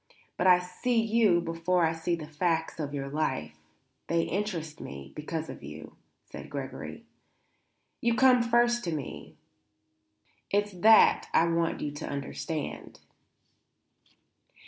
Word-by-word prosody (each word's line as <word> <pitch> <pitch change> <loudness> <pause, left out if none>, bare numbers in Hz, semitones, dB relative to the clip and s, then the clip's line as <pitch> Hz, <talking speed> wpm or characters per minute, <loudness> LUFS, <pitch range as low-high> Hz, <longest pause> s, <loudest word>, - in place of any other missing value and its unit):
But - - +1
I 180 -1 +8
see 180 +7 -1
you 220 -5 +3
before 170 +1 +1
I 160 - +1
see 165 +1 -1
the 160 -2 -7
facts 160 +1 -1
of 145 -2 -3
your 140 -1 -4
life; 135 - -2 0.5
they 165 0 +1
interest 175 -6 -3
me 70 0 -9
because 155 +1 -4
of - - -9
you," - - -10 0.3
said - - -10
Gregory. - - -7 1.0
"You 235 0 +2
come 255 -1 +5
first 240 +1 +2
to 170 - -1
me. 145 -4 -7 1.1
It's 205 +1 +1
that 215 +4 +5
I 165 - +5
want 165 0 0
you 145 - -2
to 145 - -6
understand." 145 +2 -5
170 Hz, 130 wpm, -29 LUFS, 155-210 Hz, 1.1 s, I